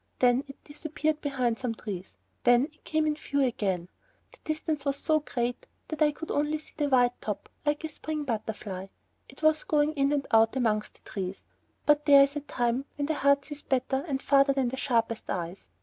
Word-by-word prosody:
Then 250 Hz, +1 st, +4 dB
it 275 Hz, -, -13 dB
disappeared 310 Hz, +1 st, -2 dB
behind 255 Hz, -5 st, 0 dB
some 245 Hz, -3 st, -2 dB
trees, 195 Hz, -4 st, -7 dB, 0.3 s
then 245 Hz, +1 st, +5 dB
it 310 Hz, +1 st, -18 dB
came 315 Hz, -1 st, +1 dB
in 305 Hz, -, +2 dB
view 285 Hz, -1 st, -1 dB
again. 195 Hz, -8 st, -1 dB, 0.4 s
The -, -, -18 dB
distance 310 Hz, -1 st, -2 dB
was 280 Hz, -1 st, 0 dB
so 310 Hz, +1 st, +2 dB
great 245 Hz, -4 st, -3 dB, 0.2 s
that 315 Hz, 0 st, -5 dB
I 300 Hz, -1 st, +5 dB
could 320 Hz, +2 st, -7 dB
only 300 Hz, +1 st, +1 dB
see 310 Hz, -, -15 dB
a 295 Hz, -, +2 dB
white 245 Hz, -2 st, +5 dB
top, 205 Hz, -2 st, -4 dB, 0.2 s
like 295 Hz, +2 st, +1 dB
a 315 Hz, -, -3 dB
spring 305 Hz, 0 st, -4 dB
butterfly. 215 Hz, -6 st, -4 dB, 0.4 s
It -, -, -15 dB
was 310 Hz, 0 st, +4 dB
going 300 Hz, 0 st, +2 dB
in 275 Hz, -1 st, +2 dB
and 285 Hz, -1 st, 0 dB
out 225 Hz, +1 st, +5 dB
amongst 220 Hz, -5 st, 0 dB
the -, -, -20 dB
trees. 190 Hz, -1 st, -5 dB, 0.4 s
But 295 Hz, 0 st, +3 dB
there 280 Hz, -1 st, +9 dB
is 280 Hz, +2 st, -1 dB
a -, -, 0 dB
time 245 Hz, -1 st, -1 dB
when 285 Hz, -, -1 dB
the 315 Hz, -, 0 dB
heart 280 Hz, -1 st, +3 dB
sees 295 Hz, -1 st, -7 dB
better 265 Hz, +1 st, 0 dB
and 270 Hz, -3 st, -2 dB
farther 275 Hz, 0 st, +5 dB
than 265 Hz, -3 st, +1 dB
the 260 Hz, -, -4 dB
sharpest 230 Hz, -4 st, 0 dB
eyes. 175 Hz, +1 st, -4 dB
275 Hz, 205 wpm, -28 LUFS, 235-295 Hz, 0.4 s, there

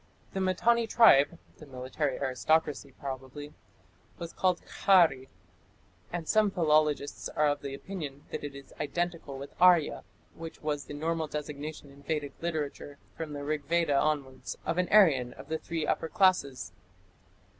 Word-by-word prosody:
The 190 Hz, -, -2 dB
Mitanni 225 Hz, +5 st, +2 dB
tribe 170 Hz, -9 st, +6 dB, 0.2 s
(the 155 Hz, -, -12 dB
military 130 Hz, +2 st, -3 dB
aristocracy 140 Hz, +1 st, 0 dB
probably) 135 Hz, +2 st, -7 dB, 0.6 s
was 170 Hz, -1 st, -7 dB
called 185 Hz, -2 st, +1 dB
"Kharri", 170 Hz, -9 st, +3 dB, 0.8 s
and 170 Hz, -2 st, -4 dB
some 215 Hz, -1 st, +4 dB
philologists 155 Hz, -5 st, +1 dB
are 150 Hz, -, +1 dB
of 145 Hz, 0 st, -1 dB
opinion 140 Hz, 0 st, -6 dB
that -, -, -4 dB
it 145 Hz, -1 st, -6 dB
is 140 Hz, 0 st, -12 dB
identical 160 Hz, -1 st, -3 dB
with 140 Hz, +1 st, -9 dB
"Arya", 180 Hz, -4 st, +5 dB, 0.3 s
which 165 Hz, -1 st, -10 dB
was 145 Hz, -2 st, -2 dB
"the 145 Hz, -, -8 dB
normal 160 Hz, +1 st, -1 dB
designation 150 Hz, 0 st, -6 dB
in 140 Hz, +1 st, -16 dB
Vedic 145 Hz, -2 st, -3 dB
literature 150 Hz, -3 st, -4 dB, 0.2 s
from 160 Hz, -2 st, -6 dB
the 145 Hz, 0 st, -5 dB
Rigveda 155 Hz, +1 st, 0 dB
onwards 140 Hz, -3 st, -1 dB
of 170 Hz, -, -1 dB
an 180 Hz, -, 0 dB
Aryan 145 Hz, -13 st, +5 dB
of -, -, -13 dB
the 160 Hz, 0 st, -2 dB
three 165 Hz, -2 st, -3 dB
upper 165 Hz, -, -1 dB
classes". 140 Hz, -, +2 dB
150 Hz, 145 wpm, -29 LUFS, 140-170 Hz, 0.8 s, tribe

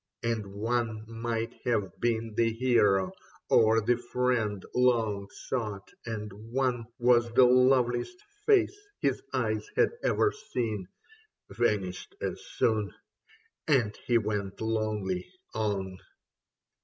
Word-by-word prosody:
And 115 Hz, -3 st, -1 dB
one 110 Hz, 0 st, -1 dB
might 115 Hz, 0 st, -3 dB
have 110 Hz, -6 st, -1 dB
been 115 Hz, -2 st, 0 dB
The 115 Hz, +1 st, +2 dB
hero 110 Hz, -6 st, +3 dB, 0.4 s
or 110 Hz, 0 st, +5 dB
the 120 Hz, +2 st, +2 dB
friend 120 Hz, -4 st, -1 dB
long 115 Hz, -6 st, +2 dB
sought, 105 Hz, -6 st, -4 dB, 0.2 s
and 105 Hz, -3 st, -4 dB
one 120 Hz, +2 st, -2 dB
Was 120 Hz, -1 st, +4 dB
the 125 Hz, +1 st, +7 dB
loveliest 125 Hz, -, +3 dB, 0.3 s
face 400 Hz, -3 st, +4 dB, 0.2 s
his 140 Hz, -4 st, 0 dB
eyes 110 Hz, -5 st, -1 dB
had -, -, +4 dB
ever 415 Hz, -, +2 dB
seen, 115 Hz, -, -3 dB, 0.6 s
(Vanished 100 Hz, -6 st, -1 dB
as -, -, -3 dB
soon) 110 Hz, -3 st, 0 dB, 0.7 s
and 120 Hz, -8 st, +2 dB
he 120 Hz, -, +4 dB
went 105 Hz, -3 st, -2 dB
lonely 110 Hz, -, -2 dB, 0.2 s
on. 100 Hz, -4 st, -2 dB
115 Hz, 110 wpm, -29 LUFS, 105-125 Hz, 0.7 s, the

